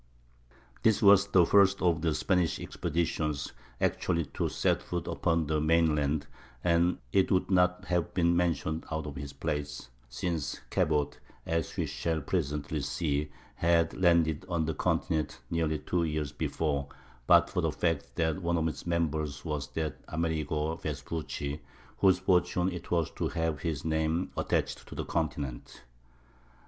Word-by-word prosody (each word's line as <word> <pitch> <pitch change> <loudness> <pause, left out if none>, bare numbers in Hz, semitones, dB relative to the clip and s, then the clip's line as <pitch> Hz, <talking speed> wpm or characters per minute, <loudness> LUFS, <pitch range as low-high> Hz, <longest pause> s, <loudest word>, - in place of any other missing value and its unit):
This 110 -2 +4
was 100 0 +7
the 90 -3 +5
first 100 +1 +5
of 85 -3 +2
the 80 -2 +1
Spanish 90 -4 +1
expeditions 75 -3 -2 0.3
actually 85 -3 +1
to - - -1
set - - +1
foot 90 -2 -4
upon 85 -2 +1
the 75 0 0
mainland; 75 -2 +2 0.4
and 85 0 +3 0.2
it 95 - +4
would 95 0 +2
not 90 -1 +3
have 90 -2 0
been 85 -1 +3
mentioned 80 -2 0
out 80 -1 -3
of 75 -2 -6
its 70 -1 -6
place 75 -3 -4 0.2
(since 80 +4 -3
Cabot, 75 -1 +1 0.3
as 80 -1 -2
we - - +1
shall 80 -1 -2
presently 75 -1 -2
see, 75 0 -1 0.2
had 85 -1 +2
landed 85 -4 +3
on 85 -3 0
the 80 - -1
continent 75 +1 -1
nearly 80 -2 +1
two 85 +3 -1
years 75 -3 -2
before) 70 0 -1 0.4
but - - +7
for - - -1
the - - +1
fact 80 -5 -1
that 80 +2 0
one 85 0 +1
of 80 0 +1
its 80 - -5
members 80 -4 -1
was 75 -3 -2
that 80 -2 -3
Amerigo 80 -1 -1
Vespucci 75 -2 -4 0.4
whose 95 -2 +5
fortune 90 0 +2
it 90 - -7
was 85 -4 +1
to - - -2
have 80 -2 -1
his 80 -4 -3
name 80 +2 0
attached - - -1
to - - -9
the - - -3
continent. 65 -4 -3
80 Hz, 150 wpm, -30 LUFS, 75-85 Hz, 0.4 s, was